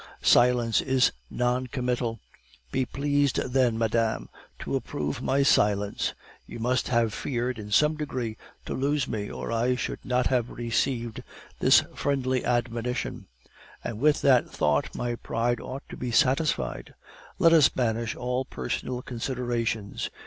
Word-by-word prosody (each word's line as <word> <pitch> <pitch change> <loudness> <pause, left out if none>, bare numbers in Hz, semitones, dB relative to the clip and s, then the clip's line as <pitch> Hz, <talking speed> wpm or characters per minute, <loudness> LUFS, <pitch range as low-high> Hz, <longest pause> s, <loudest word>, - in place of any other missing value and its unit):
Silence 120 -2 +4
is 130 -1 +3 0.2
non 125 +1 0
committal; 125 -2 -2 0.5
be 130 - +1
pleased 145 -2 +1
then, 125 -3 +1
madame, 115 0 0 0.3
to - - -3
approve 75 0 -3
my 140 +1 +2
silence. 105 -5 +2 0.3
You - - -8
must 125 +2 0
have 115 -3 +2
feared, 125 0 -2
in 105 -1 -7
some 150 +8 +3
degree, 125 -7 -3 0.3
to - - -4
lose 140 0 0
me, 105 -2 -3
or - - -5
I 120 +2 +1
should - - -4
not 125 0 +1
have 125 -2 +1
received 120 0 -2 0.4
this - - +6
friendly 130 -3 0
admonition; 120 0 -2 0.6
and 110 -2 -4
with 150 +3 +3
that 130 -3 +4
thought 75 -1 0
my 120 0 -2
pride 120 +2 -1
ought 135 +2 -7
to - - -8
be 125 - -3
satisfied. 135 +5 +1 0.4
Let 165 0 +5
us 155 -6 +7
banish 115 -2 -1
all 125 +1 -1
personal 125 -1 -4
considerations. 120 -4 -2
125 Hz, 140 wpm, -27 LUFS, 115-130 Hz, 0.6 s, us